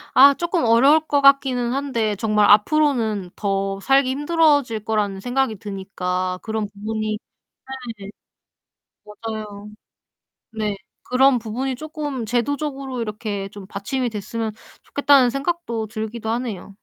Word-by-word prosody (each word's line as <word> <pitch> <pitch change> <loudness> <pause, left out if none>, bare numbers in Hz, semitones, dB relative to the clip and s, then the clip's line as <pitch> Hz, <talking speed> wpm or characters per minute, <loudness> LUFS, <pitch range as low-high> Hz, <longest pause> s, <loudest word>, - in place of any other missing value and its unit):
아 280 +2 +9
쪼끔 345 +1 -1
어려울 270 +7 +5
것 285 - +2
같기는 260 -3 +4
한데 235 -7 -1
정말 210 -1 +2
앞으로는 220 - +3
더 195 -1 -1
살기 270 +1 +3
힘들어질 290 -6 +2
거라는 210 -3 -1
생각이 245 0 -1
드니까 185 -2 -3
그런 220 -2 -3
부분이 215 +1 -3 0.8
네. 195 0 -9 1.0
맞아요. 210 -1 -7 0.8
네. 215 -2 -2 0.3
그런 260 0 +4
부분이 245 +4 -3
쪼끔 300 -4 -5
제도적으로 270 +2 -2
이렇게 210 -2 -4
좀 200 -1 -10
받침이 225 +7 -3
됐으면 220 +1 -4 0.3
좋겠다는 285 -3 +4
생각도 275 -5 -2
들기도 220 +1 -4
하네요. 225 -5 -4
225 Hz, 280 characters per minute, -22 LUFS, 210-270 Hz, 1.0 s, 아